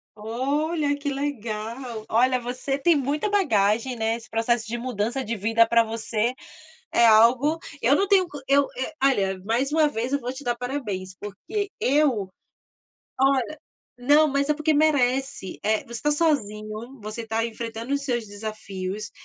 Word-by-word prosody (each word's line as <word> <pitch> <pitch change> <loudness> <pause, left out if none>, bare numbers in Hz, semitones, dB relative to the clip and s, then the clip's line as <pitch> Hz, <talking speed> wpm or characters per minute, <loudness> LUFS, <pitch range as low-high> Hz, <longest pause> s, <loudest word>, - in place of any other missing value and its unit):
Olha, 285 +7 -1
que 285 0 -3
legal! 235 -4 -4
Olha, 255 +3 +3
você 250 +3 -3
tem 320 +3 +3
muita 285 +8 -1
bagagem, 230 - +2
né. 225 0 0
Esse 230 - -14
processo 225 0 0
de 235 +2 -3
mudança 240 +1 -2
de 230 -2 -3
vida 225 +3 +3
para 230 0 +4
você 225 +1 -1 0.6
é 235 - +5
algo, 240 +8 +5 0.2
eu 260 +5 +4
não 395 +6 +1
tenho 380 -3 +4
con 295 -4 -8
eu 280 +1 +3
eu, 260 +5 -3
olha, 195 -8 +2
mais 245 +6 0
uma 310 0 +4
vez 245 -2 -3
eu 280 - +1
vou 250 +1 -4
te 280 - -9
dar 240 -2 0
parabéns, 210 -8 -4
porque 375 - -5
eu, 255 -8 +2 0.9
olha, 270 +2 +2 0.4
não, 290 +5 +5
mas 280 +1 0
é 300 - +3
porque 305 +1 +1
merece, 270 -7 +1
eh, 215 +1 +1
você - - -17
está 295 +6 0
sozinho, 235 -5 -1
você 215 +2 -5
está 225 0 -1
enfrentando 230 +2 -5
os 280 0 -1
seus 240 -4 -1
desafios, 205 -1 -6
245 Hz, 160 wpm, -24 LUFS, 220-285 Hz, 0.9 s, é